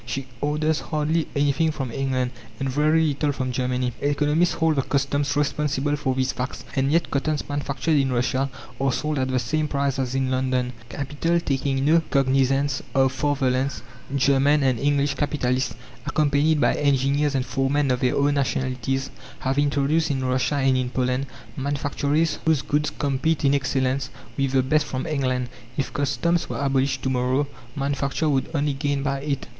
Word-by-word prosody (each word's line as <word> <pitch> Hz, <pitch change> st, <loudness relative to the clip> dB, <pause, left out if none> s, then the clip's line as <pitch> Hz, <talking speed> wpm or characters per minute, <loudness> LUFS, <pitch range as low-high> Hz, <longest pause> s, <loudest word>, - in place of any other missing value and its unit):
She 130 Hz, +3 st, -4 dB, 0.2 s
orders 150 Hz, +1 st, +1 dB
hardly 155 Hz, +1 st, -1 dB
anything 145 Hz, +3 st, +2 dB
from 135 Hz, -5 st, -3 dB
England, 130 Hz, -1 st, -1 dB, 0.3 s
and 135 Hz, -, -1 dB
very 155 Hz, +4 st, +3 dB
little 145 Hz, +1 st, 0 dB
from 130 Hz, -2 st, -3 dB
Germany. 125 Hz, 0 st, -1 dB
Economists 150 Hz, +4 st, +2 dB
hold 160 Hz, -2 st, +1 dB
the -, -, +4 dB
customs 140 Hz, +1 st, 0 dB
responsible 145 Hz, -1 st, 0 dB
for 135 Hz, -3 st, -1 dB
these 130 Hz, 0 st, +1 dB
facts, 125 Hz, +2 st, -5 dB
and 135 Hz, +1 st, +1 dB
yet 170 Hz, +2 st, +1 dB
cottons 145 Hz, +1 st, -1 dB
manufactured 145 Hz, +1 st, 0 dB
in 135 Hz, -1 st, +1 dB
Russia 130 Hz, +2 st, 0 dB, 0.3 s
are 135 Hz, -1 st, +2 dB
sold 150 Hz, +2 st, -1 dB
at 130 Hz, -, +1 dB
the 130 Hz, 0 st, 0 dB
same 150 Hz, +6 st, 0 dB
price 140 Hz, -2 st, -1 dB
as 130 Hz, -1 st, -1 dB
in 135 Hz, -1 st, 0 dB
London. 130 Hz, -1 st, 0 dB, 0.2 s
Capital 145 Hz, +6 st, -1 dB
taking 135 Hz, -3 st, -1 dB
no 165 Hz, +3 st, +5 dB
cognizance 135 Hz, +1 st, +2 dB
of 135 Hz, -1 st, +4 dB
father 135 Hz, -1 st, +1 dB
lands, 130 Hz, -3 st, -1 dB, 0.3 s
German 140 Hz, +2 st, +3 dB
and 130 Hz, -3 st, +2 dB
English 140 Hz, +1 st, +2 dB
capitalists, 135 Hz, -3 st, -1 dB, 0.3 s
accompanied 150 Hz, +1 st, +2 dB
by 120 Hz, -, +3 dB
engineers 140 Hz, +1 st, +1 dB
and 130 Hz, -1 st, 0 dB
foremen 135 Hz, +1 st, +1 dB
of 125 Hz, -, +1 dB
their 125 Hz, -1 st, +1 dB
own 145 Hz, +1 st, +2 dB
nationalities, 135 Hz, -1 st, -1 dB, 0.3 s
have 135 Hz, +2 st, 0 dB
introduced 145 Hz, +3 st, +2 dB
in 135 Hz, -2 st, -1 dB
Russia 130 Hz, +3 st, +1 dB
and 135 Hz, -2 st, +3 dB
in 130 Hz, -1 st, -1 dB
Poland 130 Hz, +1 st, -1 dB, 0.3 s
manufactories 145 Hz, +3 st, 0 dB
whose 160 Hz, -4 st, +2 dB
goods 150 Hz, +1 st, 0 dB
compete 145 Hz, +2 st, 0 dB
in 135 Hz, -, +4 dB
excellence 130 Hz, -1 st, 0 dB, 0.3 s
with 135 Hz, -1 st, 0 dB
the 130 Hz, -1 st, +4 dB
best 150 Hz, +3 st, +2 dB
from 130 Hz, 0 st, -3 dB
England. 130 Hz, -5 st, -1 dB, 0.3 s
If 140 Hz, -, -2 dB
customs 155 Hz, +5 st, 0 dB
were -, -, -3 dB
abolished 135 Hz, -1 st, 0 dB
to 130 Hz, -, 0 dB
morrow, 130 Hz, +3 st, +1 dB, 0.3 s
manufacture 140 Hz, +2 st, -1 dB
would 135 Hz, -2 st, 0 dB
only 145 Hz, 0 st, +1 dB
gain 140 Hz, 0 st, -1 dB
by 140 Hz, -1 st, -1 dB
it. 140 Hz, -2 st, -2 dB
140 Hz, 170 wpm, -24 LUFS, 130-145 Hz, 0.3 s, no